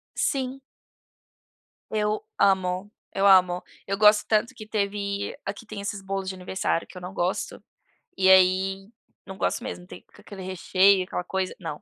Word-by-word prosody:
Sim. 270 Hz, -1 st, -1 dB, 1.3 s
Eu 215 Hz, 0 st, 0 dB, 0.2 s
amo, 190 Hz, +1 st, +2 dB, 0.2 s
eu 195 Hz, +1 st, +3 dB
amo, 180 Hz, -2 st, +5 dB, 0.2 s
eu 195 Hz, 0 st, -2 dB
gosto 210 Hz, 0 st, +5 dB
tanto 215 Hz, +1 st, +1 dB
que 215 Hz, -, -10 dB
teve 200 Hz, -1 st, -2 dB
aqui 200 Hz, +3 st, -6 dB
tem 210 Hz, -2 st, -7 dB
esses 200 Hz, -1 st, -4 dB
bolos 195 Hz, 0 st, -4 dB
de -, -, -4 dB
aniversário 180 Hz, -2 st, -2 dB
que 185 Hz, -, -13 dB
eu -, -, -8 dB
não 180 Hz, +2 st, -7 dB
gosto 180 Hz, +1 st, -2 dB, 0.5 s
e 190 Hz, 0 st, +3 dB
aí 190 Hz, +1 st, +4 dB, 0.4 s
não 190 Hz, -, -8 dB
gosto -, -, -1 dB
mesmo, 180 Hz, 0 st, -7 dB
tem 180 Hz, -, -12 dB
aquele 200 Hz, -2 st, -10 dB
recheio, 190 Hz, +1 st, +3 dB
aquela 180 Hz, 0 st, -4 dB
coisa, 190 Hz, 0 st, -2 dB
não. 160 Hz, -4 st, -6 dB
195 Hz, 155 wpm, -25 LUFS, 185-205 Hz, 1.3 s, amo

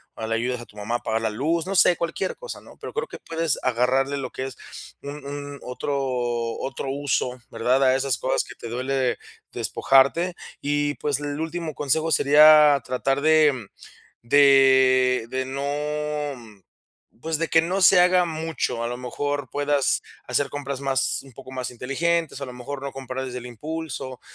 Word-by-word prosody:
o 110 Hz, -, -5 dB
le 115 Hz, -, -1 dB
ayudas 120 Hz, +1 st, -1 dB
a -, -, -10 dB
tu 105 Hz, -, -22 dB
mamá 105 Hz, +3 st, -3 dB
a 120 Hz, -, 0 dB
pagar 110 Hz, 0 st, -1 dB
la 110 Hz, -, 0 dB
luz, 160 Hz, +10 st, -1 dB
no 195 Hz, -, -2 dB
sé, 180 Hz, -, +6 dB
cualquier 170 Hz, +3 st, -3 dB
cosa, -, -, -8 dB
¿no? -, -, -16 dB
Pero -, -, -8 dB
creo 455 Hz, +2 st, -2 dB
que -, -, -10 dB
puedes 165 Hz, -2 st, -2 dB
agarrarle 130 Hz, +3 st, +1 dB
lo 130 Hz, -2 st, -5 dB
que 130 Hz, -, -4 dB
es 135 Hz, -, -8 dB, 0.5 s
un 145 Hz, 0 st, -7 dB
un 145 Hz, 0 st, -6 dB
otro 125 Hz, +3 st, -4 dB, 0.6 s
otro 135 Hz, 0 st, -4 dB
uso, 135 Hz, -2 st, -1 dB
¿verdad? 125 Hz, +4 st, +2 dB
A 130 Hz, -1 st, +4 dB
esas 135 Hz, -2 st, 0 dB
cosas 130 Hz, -, 0 dB
que -, -, -12 dB
te -, -, -9 dB
duele 130 Hz, +1 st, -1 dB, 0.3 s
despojarte. 140 Hz, +7 st, +2 dB, 0.3 s
Y, 145 Hz, 0 st, 0 dB
pues, 145 Hz, -2 st, -1 dB
el 145 Hz, 0 st, -4 dB
último 160 Hz, -1 st, -4 dB
consejo 160 Hz, +3 st, 0 dB
sería 150 Hz, 0 st, +7 dB
tratar 135 Hz, +3 st, -1 dB
de 150 Hz, -7 st, +3 dB, 0.6 s
de 130 Hz, -2 st, +5 dB
de 130 Hz, 0 st, -2 dB
no, 145 Hz, -5 st, -4 dB, 0.6 s
pues, 160 Hz, -1 st, -2 dB
de 165 Hz, -, -1 dB
que 165 Hz, 0 st, +4 dB
no 185 Hz, +4 st, -1 dB
se 180 Hz, 0 st, +7 dB
haga 180 Hz, 0 st, +5 dB
mucho. 160 Hz, -7 st, -3 dB
A 115 Hz, -, -1 dB
lo 120 Hz, -, -4 dB
mejor 145 Hz, +3 st, -3 dB
puedas 145 Hz, -1 st, +1 dB, 0.2 s
hacer 145 Hz, -, 0 dB
compras 140 Hz, -2 st, -5 dB
más, 135 Hz, -1 st, 0 dB
un 135 Hz, -, -16 dB
poco 130 Hz, +1 st, -12 dB
más 130 Hz, -1 st, -4 dB
inteligentes, 140 Hz, +5 st, -1 dB
a -, -, -3 dB
lo 125 Hz, -, -8 dB
mejor 130 Hz, +3 st, -7 dB
no 140 Hz, -, -5 dB
comprar 130 Hz, 0 st, -5 dB
desde 125 Hz, -1 st, -5 dB
el 125 Hz, -, -9 dB
impulso, 130 Hz, 0 st, -6 dB
140 Hz, 180 wpm, -24 LUFS, 125-150 Hz, 0.6 s, sería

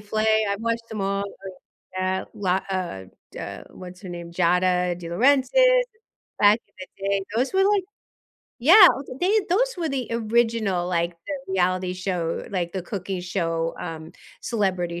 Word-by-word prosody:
Flay, 220 Hz, +1 st, +1 dB
I've 200 Hz, +1 st, -2 dB
watched 230 Hz, 0 st, -2 dB
them 215 Hz, -, -5 dB
all, 195 Hz, +1 st, -1 dB
I 195 Hz, -1 st, -10 dB, 0.5 s
Yeah, 185 Hz, 0 st, -1 dB
lot 190 Hz, -2 st, 0 dB
of 170 Hz, -, -4 dB, 0.2 s
da -, -, -7 dB
What's 180 Hz, 0 st, -11 dB
her 185 Hz, -, -8 dB
name? 170 Hz, -1 st, -7 dB
Giada 180 Hz, 0 st, +2 dB
DeLaurentis, 250 Hz, +11 st, +2 dB, 0.9 s
back 205 Hz, +2 st, +6 dB
in -, -, -38 dB
the 185 Hz, -, -8 dB, 0.2 s
day, 200 Hz, -1 st, +1 dB
those 255 Hz, +9 st, 0 dB
were 385 Hz, -, +4 dB
like 405 Hz, -1 st, +3 dB, 0.8 s
Yeah, 300 Hz, -, +6 dB
I 385 Hz, -4 st, +11 dB
was 275 Hz, -, -7 dB
like 255 Hz, -, -9 dB
they 415 Hz, +4 st, +3 dB
those -, -, +2 dB
were 335 Hz, -2 st, -2 dB
the 265 Hz, -4 st, -3 dB
original, 225 Hz, -5 st, +1 dB
like, 170 Hz, -1 st, 0 dB, 0.2 s
the 275 Hz, -8 st, -5 dB
reality 185 Hz, 0 st, +1 dB
show 180 Hz, -3 st, -2 dB
like, 175 Hz, -3 st, -2 dB
the 190 Hz, -2 st, -3 dB
cooking 190 Hz, -1 st, -4 dB
show, 165 Hz, -2 st, -2 dB
um, 160 Hz, 0 st, -7 dB, 0.3 s
Celebrity 185 Hz, -6 st, -1 dB
195 Hz, 165 wpm, -24 LUFS, 180-230 Hz, 0.9 s, I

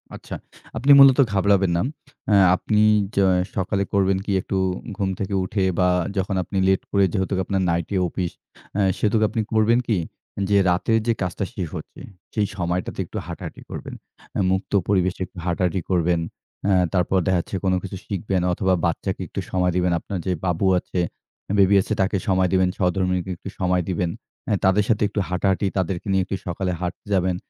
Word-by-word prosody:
আচ্ছা, -, -, -8 dB, 0.4 s
আপনি 135 Hz, +5 st, +3 dB
মূলত 135 Hz, -1 st, +8 dB
ঘাবড়াবেন 95 Hz, -2 st, +3 dB
না। -, -, +1 dB, 0.5 s
আ -, -, +5 dB, 0.2 s
আপনি 105 Hz, +3 st, +1 dB, 0.3 s
য -, -, -14 dB, 0.4 s
সকালে 100 Hz, +1 st, 0 dB
করবেন 95 Hz, -1 st, +3 dB
কি 100 Hz, -, -2 dB
একটু 95 Hz, -, -4 dB, 0.4 s
ঘুম 95 Hz, -2 st, 0 dB
থেকে 100 Hz, 0 st, -3 dB
উঠে 95 Hz, +1 st, -1 dB, 0.2 s
বা 90 Hz, -, +4 dB, 0.3 s
যখন 95 Hz, +1 st, -1 dB
আপনি 95 Hz, -, -5 dB
late 95 Hz, 0 st, +2 dB
করে 100 Hz, -1 st, +3 dB
যেহেতু 95 Hz, 0 st, -1 dB
আপনার 95 Hz, -1 st, 0 dB
night 85 Hz, 0 st, 0 dB
এ -, -, +3 dB
অফিস 90 Hz, 0 st, -3 dB, 0.5 s
আ 100 Hz, -, +3 dB, 0.2 s
সেহেতু 105 Hz, 0 st, +1 dB
আপনি 115 Hz, -, -1 dB
করবেন 110 Hz, +2 st, +4 dB
কি 110 Hz, -5 st, +2 dB, 0.5 s
যে, 100 Hz, -, +4 dB
রাতের 100 Hz, +6 st, +2 dB
যে, 115 Hz, -, +4 dB
কাজটা 90 Hz, +2 st, -2 dB
শেষ 95 Hz, -8 st, -3 dB
হচ্ছে -, -, -10 dB, 0.3 s
সেই 105 Hz, -2 st, +1 dB
সময়টাতে 90 Hz, 0 st, -2 dB
একটু -, -, -8 dB
হাঁটাহাঁটি -, -, -7 dB
করবেন। -, -, -7 dB, 0.4 s
আ -, -, 0 dB
মুক্ত 95 Hz, +1 st, -2 dB, 0.2 s
পরিবেশে 95 Hz, -2 st, +1 dB
একটু 90 Hz, -, -19 dB
হাঁটাহাঁটি 90 Hz, +1 st, 0 dB
করবেন। 90 Hz, -2 st, +2 dB, 0.5 s
আ -, -, +4 dB, 0.2 s
তারপর 90 Hz, +1 st, +2 dB
দেখা 95 Hz, -2 st, +3 dB
যাচ্ছে 95 Hz, -, -7 dB
কোন 95 Hz, -, +3 dB
কিছু 95 Hz, -1 st, -6 dB
শিখবেন 95 Hz, -2 st, -1 dB
অথবা 95 Hz, +1 st, +1 dB
বাচ্চাকে 85 Hz, -, -2 dB
একটু -, -, -5 dB
সময় 90 Hz, -1 st, +1 dB
দিবেন। 90 Hz, 0 st, +2 dB
আপনার 100 Hz, -, -5 dB
যে, 95 Hz, -, 0 dB
বাবু 90 Hz, +2 st, 0 dB
আছে, 90 Hz, -, -4 dB, 0.6 s
বেবি 100 Hz, +1 st, +5 dB
আছে -, -, -3 dB
তাকে 95 Hz, +1 st, +1 dB
সময় 95 Hz, -1 st, +2 dB
দিবেন, 95 Hz, -1 st, +3 dB
স্বহধর্মীনীকে 90 Hz, 0 st, 0 dB
একটু 95 Hz, -, -8 dB
সময় 90 Hz, -1 st, +2 dB
দিবেন। 90 Hz, -1 st, 0 dB, 0.4 s
আ -, -, +2 dB
তাদের 95 Hz, +2 st, +4 dB
সাথে 110 Hz, -2 st, +2 dB
একটু 105 Hz, -, -3 dB
হাঁটাহাঁটি 95 Hz, +2 st, +1 dB
তাদেরকে 95 Hz, +1 st, -2 dB
নিয়ে 95 Hz, -1 st, +2 dB
একটু 95 Hz, -, -3 dB
সকালে 90 Hz, +1 st, -2 dB
হাঁটতে 90 Hz, +3 st, -5 dB
যাবেন। 90 Hz, -1 st, +1 dB
95 Hz, 180 wpm, -23 LUFS, 90-100 Hz, 0.6 s, মূলত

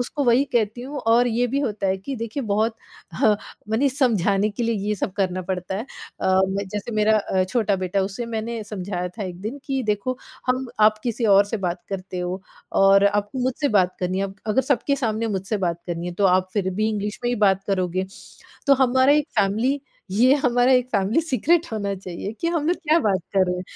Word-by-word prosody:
उसको 280 Hz, +4 st, -2 dB
वही 245 Hz, +2 st, +4 dB
कहती 225 Hz, -1 st, 0 dB
हूँ 280 Hz, +4 st, -6 dB
और 240 Hz, +2 st, +5 dB
ये 240 Hz, +2 st, +1 dB
भी 265 Hz, +3 st, -1 dB
होता 210 Hz, -7 st, -2 dB
है 190 Hz, 0 st, +1 dB
कि 195 Hz, +9 st, -6 dB
देखिए 230 Hz, +4 st, -4 dB
बहुत 220 Hz, +1 st, 0 dB, 0.4 s
ह 215 Hz, -, +4 dB, 0.4 s
माने 230 Hz, +6 st, +2 dB
समझाने 210 Hz, -, +2 dB
के 210 Hz, +3 st, -4 dB
लिए 230 Hz, 0 st, +1 dB
ये 210 Hz, -, +1 dB
सब 190 Hz, -, -3 dB
करना 185 Hz, -2 st, -1 dB
पड़ता 185 Hz, +1 st, -3 dB
है। 210 Hz, -, -3 dB, 0.4 s
अ, 190 Hz, 0 st, +3 dB
मैं 195 Hz, +1 st, -2 dB
जैसे 210 Hz, +3 st, -5 dB
मेरा 215 Hz, +1 st, +4 dB
अ, 190 Hz, -2 st, 0 dB
छोटा 205 Hz, +1 st, 0 dB
बेटा 185 Hz, +1 st, -1 dB
उसे 200 Hz, +5 st, -4 dB
मैंने 230 Hz, 0 st, -4 dB
समझाया 185 Hz, -3 st, -4 dB
था 210 Hz, +4 st, -7 dB
एक 180 Hz, -1 st, -7 dB
दिन 225 Hz, +8 st, -5 dB
कि 270 Hz, -2 st, -1 dB
देखो 210 Hz, +5 st, -1 dB, 0.3 s
हम 255 Hz, +1 st, 0 dB
आप 215 Hz, 0 st, +5 dB
किसी 235 Hz, -1 st, -1 dB
और 200 Hz, +1 st, +6 dB
से 215 Hz, +3 st, -3 dB
बात 175 Hz, 0 st, -3 dB
करते 190 Hz, -1 st, -5 dB
हो 180 Hz, +2 st, -4 dB, 0.4 s
और 195 Hz, 0 st, +6 dB
आपको 205 Hz, +4 st, -1 dB
मुझसे 260 Hz, +3 st, 0 dB
बात 185 Hz, -5 st, +2 dB
करनी 185 Hz, +1 st, -1 dB
है, 195 Hz, -, 0 dB
अब 195 Hz, 0 st, -6 dB
अगर 220 Hz, +5 st, +2 dB
सबके 280 Hz, +2 st, 0 dB
सामने 230 Hz, -4 st, -1 dB
मुझसे 195 Hz, +3 st, -2 dB
बात 170 Hz, 0 st, -4 dB
करनी 170 Hz, 0 st, -4 dB
है, 180 Hz, -, -4 dB
तो 200 Hz, -, 0 dB
आप 185 Hz, 0 st, +3 dB
फिर 195 Hz, -3 st, 0 dB
भी 215 Hz, +3 st, +1 dB
इंग्लिश 210 Hz, -1 st, -3 dB
में -, -, +2 dB
ही 245 Hz, -, 0 dB
बात 195 Hz, 0 st, +2 dB
करोगे। 185 Hz, -1 st, -1 dB, 0.6 s
तो 280 Hz, -, +7 dB
हमारा 260 Hz, +1 st, +4 dB
एक 300 Hz, -1 st, +2 dB
फ़ेेमिली 230 Hz, +8 st, +1 dB, 0.3 s
ये 245 Hz, +7 st, +5 dB
हमारा 250 Hz, -2 st, +3 dB
एक 250 Hz, -1 st, +3 dB
फ़ेेमिली 200 Hz, +9 st, +2 dB
सीक्रेट 325 Hz, +3 st, +1 dB
होना 200 Hz, -2 st, -2 dB
चाहिए 185 Hz, 0 st, -6 dB
कि -, -, -1 dB
हम 330 Hz, -3 st, -1 dB
लोग 355 Hz, -, +2 dB
क्या 320 Hz, -1 st, +2 dB
बात 200 Hz, -8 st, +2 dB, 0.2 s
कर 190 Hz, -1 st, +5 dB
रहे 180 Hz, 0 st, -1 dB
हैं। 180 Hz, -, -4 dB
210 Hz, 220 wpm, -23 LUFS, 190-245 Hz, 0.6 s, तो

